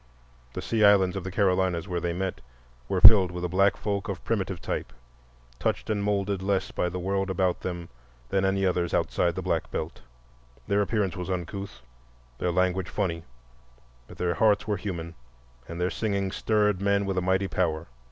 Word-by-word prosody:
The - - -5
Sea 110 -2 +1
Islands 100 -3 +5
of 95 - -3
the 95 - -4
Carolinas, 95 -3 +1
where 90 -2 -2
they 85 0 -2
met, 90 -5 -3 0.5
were 95 -2 0
filled 100 -3 +9
with 90 0 -4
a - - +1
black 95 +3 +2
folk 100 -1 -3
of 95 -2 -5
primitive 95 -5 -2
type, - - -4 0.7
touched - - -1
and 105 -1 -1
moulded 100 -1 0
less 95 -1 0
by 90 - -1
the 90 - -5
world 95 +2 -1
about 95 -1 0
them 85 -2 -5 0.4
than 95 - +1
any 95 0 +1
others 90 -2 0
outside - - +1
the - - -4
Black - - -1
Belt. 80 +1 -5 0.7
Their 100 0 +2
appearance 100 -3 0
was 90 +1 -5
uncouth, 90 -6 -5 0.6
their 90 - 0
language 90 +1 0
funny, 85 -5 -2 0.8
but - - -13
their 90 -1 0
hearts 105 +5 +2
were 105 -1 0
human 85 -4 -5 0.5
and 85 +1 -7
their 90 +1 0
singing 100 -3 -1
stirred 105 -1 +1
men 100 0 +2
with 95 -1 -2
a 90 - +1
mighty 95 +2 +1
power. 80 -4 -1
95 Hz, 180 wpm, -27 LUFS, 90-100 Hz, 0.8 s, filled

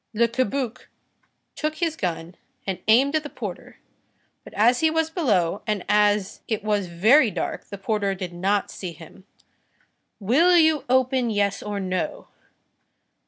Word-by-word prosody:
Le 235 +2 +3
Cabuc 255 +1 -2 0.7
took 305 0 -2
his 330 -1 -1
gun 170 - -4 0.3
and 190 -2 -3
aimed 260 +6 +4
at 310 - +2
the 295 - -8
porter; - - -8 0.7
but - - -13
as 240 +4 +4
he 320 - +3
was 320 0 0
below, 205 - 0
and 210 -3 -2
as 210 -1 +2
it 220 -2 -2
was 205 -3 0
very 220 - +4
dark, - - -4
the 200 - -8
porter 200 -1 -1
did 180 -1 -6
not 195 +3 0
see 180 -3 -7
him. 165 +4 -15 0.9
"Will 310 - +4
you 315 -3 +3
open, 255 -1 +2
yes 200 -2 0
or 205 -1 -4
no?" 185 -2 -3
210 Hz, 150 wpm, -24 LUFS, 195-270 Hz, 0.9 s, aimed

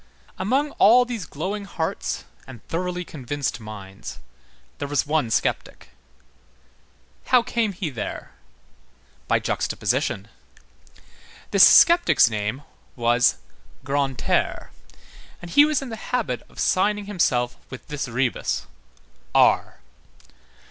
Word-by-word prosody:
Among 265 +10 0
all 245 +5 +7
these 230 -9 -5
glowing 200 +9 -4
hearts 165 -4 -3 0.2
and 125 -4 -13
thoroughly 180 +1 -3
convinced 140 -2 -4
minds, 100 -3 -9 0.6
there 145 - -3
was 145 -1 0
one 150 -5 0
sceptic. - - -2 1.4
How 250 -2 +5
came 230 -3 -1
he 180 -4 -4
there? 110 -5 -6 1.0
By - - +3
juxtaposition. 100 +3 -2 1.2
This - - +8
sceptic's 340 - +6
name 105 +6 -3 0.3
was 120 0 +3 0.5
Grantaire, 140 -1 -1 0.7
and 175 -1 -10
he 290 +8 +7
was 300 -3 0
in 265 - -7
the 225 - -6
habit 230 - -1
of - - -21
signing 205 +2 +1
himself 130 -11 0
with 130 - -10
this 145 -3 -4
rebus: 125 +1 -1 0.7
R. - - +3
150 Hz, 105 wpm, -23 LUFS, 125-210 Hz, 1.4 s, This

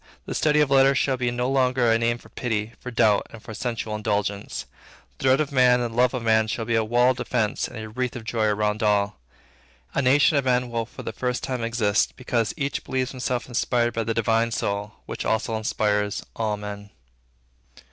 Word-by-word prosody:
The - - -4
study 150 -1 +3
of 145 -2 +1
letters 135 0 +5
shall 135 -1 +2
be 125 -1 -1
no 120 +1 -1
longer 130 -2 +2
a 115 - +3
name 120 +1 +1
for - - -17
pity, 110 -2 -2
for 125 - -7
doubt, 110 -4 +3
and 115 - -11
for 110 - -9
sensual 115 -1 -3
indulgence. 105 -1 -2 0.5
The - - -4
dread 130 +1 +5
of 150 -2 -1
man 125 -2 +5
and 120 -2 -2
the - - -9
love 125 +1 +3
of 125 - -3
man 110 -1 +3
shall 115 +1 -3
be 115 - -1
a 115 -1 +3
wall 120 +3 +3
of 130 - -4
defence 110 -5 -1
and - - -10
a 110 0 -6
wreath 125 +3 -3
of 120 - -6
joy 110 -1 -1
around 105 +1 0
all. 105 - +1 0.7
A - - +1
nation 145 +3 +4
of 140 - +1
men 125 -1 +1
will 115 -1 -2
for - - -10
the - - -5
first 125 -1 -2
time 125 -3 -2
exist, 115 -3 +1
because 120 -3 -1
each 140 -2 -2
believes 130 0 -2
himself 125 -1 -3
inspired 120 -1 0
by 115 - -1
the 115 0 -2
Divine 115 +1 +2
Soul 100 -2 -2
which - - -5
also 110 0 0
inspires 105 -1 0
all 110 -2 -1
men. 105 0 -7
115 Hz, 215 wpm, -24 LUFS, 110-125 Hz, 0.7 s, letters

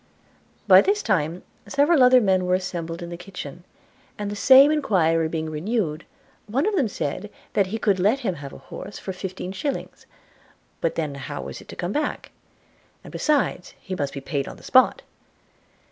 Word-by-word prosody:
By - - +9
this 415 +1 +1
time 170 -3 0 0.2
several 285 +2 +3
other 255 0 +7
men 190 -3 +2
were 180 - +3
assembled 170 -2 -4
in 170 - -7
the 170 - -6
kitchen; 175 -3 -9 0.5
and 205 -1 -4
the - - -4
same 270 +6 +7
enquiry 165 - +2
being 160 -1 -3
renewed, 160 -1 -2 0.4
one 260 - 0
of 420 0 +1
them 285 -10 +2
said, 190 +1 -4 0.2
that 200 -2 +2
he 215 +4 -3
could 200 -4 +1
let 215 +9 +2
him 200 -7 -1
have 140 -4 -9
an - - -10
horse 200 - -9
for 190 - -6
fifteen 185 0 -6
shillings: 270 +8 -5 0.7
but 165 - -1
then 155 -3 -2
how 140 +1 -6
was - - -8
it - - -16
to - - -9
come 175 +1 -3
back? 295 +6 -3 0.7
and - - -11
besides, 290 -11 0
he 190 - -7
must 145 -6 -3
be 140 - -5
paid 140 0 -3
on - - -8
the - - -17
spot. 260 0 +4
190 Hz, 185 wpm, -24 LUFS, 165-250 Hz, 0.7 s, By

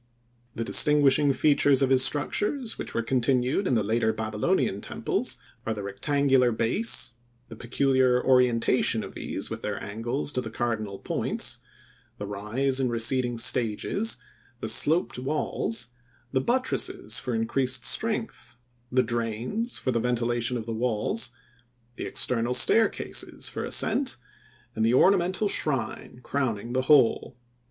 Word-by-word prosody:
The 115 - -2
distinguishing 145 +2 +4
features 140 0 +3
of 135 - +1
his 130 -1 +5
structures 215 - -1
which - - -6
were 115 - 0
continued 130 - +1
in 125 - +2
the 110 - +1
later 110 +2 +1
Babylonian 110 - -1
temples, - - -2 0.3
are 110 - -2
the 105 - -6
rectangular 130 +5 +2
base, 120 - -1 0.4
the 115 - -9
peculiar 130 +1 +2
orientation 125 -2 +2
of - - -9
these - - -5
with - - -5
their - - -3
angles 120 +7 -3
to 130 - -2
the 110 - -6
cardinal 110 -4 -3
points, - - -2 0.6
the 105 - -5
rise 110 +7 -2
in 130 -2 +1
receding 120 +1 +1
stages, 120 - +1 0.4
the 110 - -4
sloped 150 +6 +2
walls, 125 -3 -2 0.4
the 130 - +1
buttresses 260 - -1
for 125 -3 -3
increased 125 +3 0
strength, - - -2 0.4
the 130 0 +3
drains 120 - -2
for 130 - -1
the 115 - 0
ventilation 120 0 -1
of 110 - -6
the 115 - -4
walls, 120 - -1 0.7
the - - -4
external 120 0 0
staircases 120 - +1
for - - -5
ascent - - +1 0.6
and 110 - 0
the 115 +2 +3
ornamental 185 +5 +3
shrine 130 - -2
crowning 120 -4 -2
the 130 - +1
whole. 130 -4 +4
125 Hz, 135 wpm, -26 LUFS, 115-140 Hz, 0.7 s, his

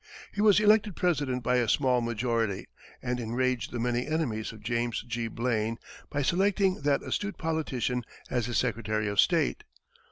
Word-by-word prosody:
He 205 - -2
was 210 -1 +6
elected 210 -2 +4
President 145 -8 0
by 125 +2 +2
a 120 -3 +1
small 130 -2 +3
majority, 115 -3 -1 0.4
and 125 0 -1
enraged 120 +1 -1
the 120 - -4
many 120 +1 0
enemies 130 -9 -1
of 110 -2 -13
James 120 +1 -1
G. 120 -1 -3
Blaine 115 -1 -1 0.3
by 145 -1 -1
selecting 190 +2 +2
that 140 -1 +1
astute 205 -3 -3
politician 135 -6 -1 0.2
as 125 -3 -1
his 120 -3 -1
secretary 110 -1 0
of 100 -1 -2
state. 165 -6 +3
125 Hz, 160 wpm, -29 LUFS, 115-160 Hz, 0.4 s, was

